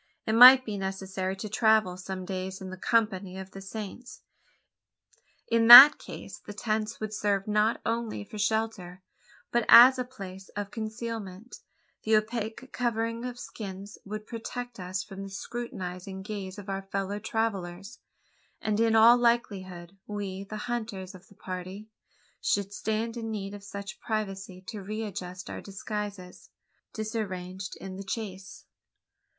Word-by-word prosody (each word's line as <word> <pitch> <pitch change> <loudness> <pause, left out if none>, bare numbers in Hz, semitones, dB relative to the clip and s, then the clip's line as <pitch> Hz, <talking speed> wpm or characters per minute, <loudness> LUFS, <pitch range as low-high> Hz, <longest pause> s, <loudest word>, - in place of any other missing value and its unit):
It 220 - 0
might 255 +3 +10
be 205 -2 -4
necessary 190 0 -3
to 195 +3 -6
travel 220 -3 +3
some 185 0 -6
days 190 0 -4
in 185 -1 -7
the - - -6
company 195 -3 0
of 190 0 -8
the 195 - -9
Saints. 215 +5 -8 1.2
In 230 -1 +2
that 265 +5 +13
case, - - -9
the 205 - -10
tents 215 +1 -2
would 215 -1 -4
serve 205 -2 0
not 210 +2 +2
only 230 -2 -2
for 215 0 -10
shelter, 210 -4 -2 0.5
but 240 0 +2
as 255 +2 +10
a - - +1
place 195 -7 -10
of 205 -1 -4
concealment. 220 -2 -6 0.4
The 220 0 +2
opaque 225 +3 -4
covering 230 -1 -1
of 250 -1 -5
skins 200 -3 -8
would 215 +1 -6
protect 245 0 -7
us 185 +1 -3
from 195 0 -9
the 195 - -7
too 195 - -8
scrutinising 190 -5 -6
gaze 195 -2 -6
of 205 -1 -9
our 195 0 -3
fellow 195 +1 -3
travellers; 200 -2 -3 0.6
and 215 -1 -1
in 225 -1 +3
all 230 +2 +8
likelihood 195 -7 -1
we 200 -2 -5
the 215 +2 -7
hunters 215 -6 -4
of 185 0 -15
the 200 - -20
party 185 +4 -7 0.5
should 200 0 0
stand 220 +3 -2
in 225 -1 -4
need 200 -2 -4
of 205 -1 -9
such 200 -1 -8
privacy 195 -4 -4
to 210 - -6
readjust 190 -3 -6
our - - -6
disguises 200 -2 -7 0.4
disarranged 190 -4 -5
in 190 0 -8
the 195 - -6
chase. 190 -2 -6
205 Hz, 150 wpm, -28 LUFS, 190-225 Hz, 1.2 s, that